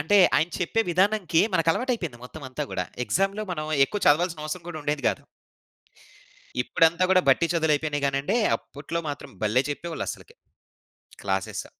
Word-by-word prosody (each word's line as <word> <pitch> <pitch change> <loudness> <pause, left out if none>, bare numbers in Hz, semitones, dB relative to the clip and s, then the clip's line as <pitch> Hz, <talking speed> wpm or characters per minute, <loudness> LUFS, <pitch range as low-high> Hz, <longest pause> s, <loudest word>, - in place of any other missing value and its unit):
అంటే 200 +7 +4 0.2
ఆయన 160 +3 +2
చెప్పే 185 +5 0
విధానంకి 190 -1 +2
మనకలవాటయిపోయింది. 170 - 0
మొత్తం 145 +4 -10
అంతా 130 +4 -4
గూడా. - - -2 0.2
ఎగ్జా‌మ్‌లో 195 - 0
మనం 155 -3 -3 0.2
ఎక్కువ 205 +8 -4
చదవాల్సినవసరం 160 +1 +1
గూడా 160 -2 -5
ఉండేది 145 -1 -2
కాదు. - - -3 1.4
ఇప్పుడంతా 165 +6 +3
గూడా 185 -1 +5
బట్టి 165 +6 +3
చదువులయిపోయినాయి 150 -2 +1
గానండి. 140 +8 0 0.2
అప్పుట్లో 150 +4 -6
మాత్రం 145 - -8
భలే 115 +5 +3
చెప్పేవాళ్ళస్సలకి. 165 +3 -6 0.9
క్లాసె‌స్. 95 -1 -2
160 Hz, 125 wpm, -25 LUFS, 145-180 Hz, 1.4 s, గూడా